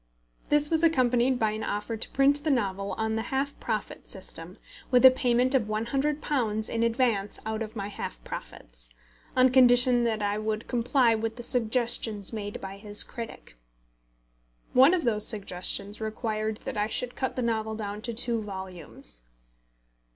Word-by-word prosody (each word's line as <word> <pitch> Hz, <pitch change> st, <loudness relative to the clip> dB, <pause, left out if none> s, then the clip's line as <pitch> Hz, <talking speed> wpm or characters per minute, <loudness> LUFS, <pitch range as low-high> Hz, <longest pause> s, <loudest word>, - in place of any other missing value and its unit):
This 295 Hz, +1 st, +3 dB
was 325 Hz, 0 st, +1 dB
accompanied 255 Hz, -5 st, +3 dB
by 220 Hz, -2 st, +1 dB
an 215 Hz, +1 st, -5 dB
offer 210 Hz, +3 st, -3 dB
to 220 Hz, -, -3 dB
print 280 Hz, +2 st, +2 dB
the 310 Hz, -, 0 dB
novel 200 Hz, -7 st, -1 dB
on 220 Hz, 0 st, -2 dB
the 225 Hz, -, -1 dB
half 275 Hz, +1 st, -2 dB
profit 220 Hz, -3 st, -4 dB
system, 180 Hz, -2 st, -6 dB, 0.3 s
with 250 Hz, 0 st, +5 dB
a 260 Hz, -, +11 dB
payment 255 Hz, 0 st, +1 dB
of 255 Hz, -5 st, +2 dB
£100 235 Hz, -1 st, -1 dB
in 230 Hz, -, -1 dB
advance 230 Hz, -4 st, 0 dB
out 220 Hz, 0 st, -3 dB
of 220 Hz, +1 st, -6 dB
my 200 Hz, -2 st, -4 dB
half -, -, -7 dB
profits, -, -, -9 dB, 0.5 s
on 255 Hz, 0 st, +5 dB
condition 245 Hz, -1 st, +5 dB
that 220 Hz, -2 st, -1 dB
I 205 Hz, +1 st, -1 dB
would 215 Hz, +1 st, -3 dB
comply 245 Hz, 0 st, +2 dB
with 225 Hz, 0 st, -3 dB
the 240 Hz, -, -8 dB
suggestions 230 Hz, -3 st, +1 dB
made 205 Hz, -1 st, -5 dB
by 195 Hz, 0 st, -8 dB
his 205 Hz, 0 st, +6 dB
critic. 230 Hz, -, -9 dB, 1.2 s
One 270 Hz, +8 st, +6 dB
of 350 Hz, -, -2 dB
these 215 Hz, -3 st, +2 dB
suggestions 200 Hz, 0 st, 0 dB
required 215 Hz, -1 st, -3 dB
that -, -, -5 dB
I 210 Hz, 0 st, +1 dB
should 245 Hz, +2 st, -2 dB
cut 260 Hz, -, -3 dB
the 255 Hz, -, -2 dB
novel 220 Hz, -1 st, -1 dB
down 210 Hz, -1 st, -5 dB
to 235 Hz, -, -4 dB
two 230 Hz, 0 st, +1 dB
volumes. 185 Hz, -, -8 dB
225 Hz, 165 wpm, -27 LUFS, 210-250 Hz, 1.2 s, a